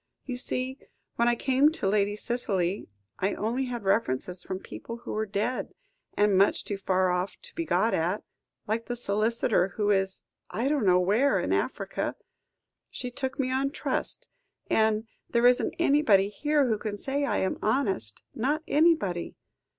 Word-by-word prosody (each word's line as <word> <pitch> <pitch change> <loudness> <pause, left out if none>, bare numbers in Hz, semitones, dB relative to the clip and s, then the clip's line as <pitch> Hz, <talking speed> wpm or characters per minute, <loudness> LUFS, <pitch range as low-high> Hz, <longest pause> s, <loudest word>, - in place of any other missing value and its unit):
You 255 - -3
see, 255 +1 -2 0.4
when 235 - +3
I 240 - +4
came 270 +4 +3
to 200 - -2
Lady 205 +1 +2
Cicely, 205 - -1 0.3
I 195 +2 0
only 240 +5 -1
had 240 -3 -4
references 180 - 0
from 185 - -4
people 230 +4 -8
who 235 - -8
were 215 0 -1
dead, 210 +5 -2 0.4
or 205 - +5
much 200 -1 +3
too 200 -2 -4
far 185 -1 +2
off 180 +2 -2
to - - -12
be 335 - -3
got 230 -6 +2
at, 175 +6 0 0.4
like 225 +2 -2
the 245 - -2
solicitor 215 -4 +1
who 210 -1 +2
is 195 -1 +1 0.3
I 235 +5 -1
don't 285 -9 +1
know 180 0 +6
where 210 +10 +3
in - - 0
Africa. - - -2 0.7
She 250 - -5
took 265 +2 -4
me 255 -1 0
on 270 +1 +1
trust, 290 - -2 0.4
and 220 0 +3 0.2
there 235 0 +2
isn't 250 +2 +4
anybody 275 - +4
here 295 +6 +1
who 220 -3 0
can 210 -2 -4
say 275 +6 -1
I 280 - +1
am 190 - -1
honest, 200 - 0
not 290 +7 0
anybody." 295 - +2
220 Hz, 165 wpm, -28 LUFS, 195-255 Hz, 0.7 s, know